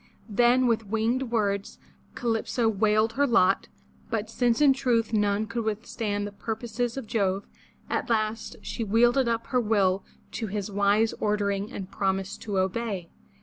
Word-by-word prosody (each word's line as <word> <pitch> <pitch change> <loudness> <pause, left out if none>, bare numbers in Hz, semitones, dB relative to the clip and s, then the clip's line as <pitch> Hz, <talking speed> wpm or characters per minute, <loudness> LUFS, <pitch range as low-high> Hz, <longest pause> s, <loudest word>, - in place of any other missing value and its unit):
*' - - -31
Then 240 +4 +4
with 225 -3 +1
winged 230 +4 0
words 200 -4 -1 0.4
Calypso 230 0 0
wailed 215 +1 +2
her 285 +1 +2
lot, 225 -7 +3 0.4
but 220 -1 -2
since 240 -1 +2
in 290 -2 +6
truth 235 -4 0
none 205 0 +2
could 230 +1 -3
withstand 210 -1 -2
the 205 - -5
purposes 230 +3 -3
of 270 - -4
Jove, 200 -3 0 0.4
at - - -2
last 220 -1 -1
she 235 - -4
yielded 240 +4 +3
up 230 -1 0
her 250 - +4
will 200 -4 +2 0.3
to 225 - -3
his 205 0 -4
wise 205 +2 +2
ordering 205 -1 0
and 195 -1 -7
promised 195 -1 -2
to 205 -3 -3
obey. 190 -2 -2
220 Hz, 155 wpm, -27 LUFS, 200-235 Hz, 0.4 s, in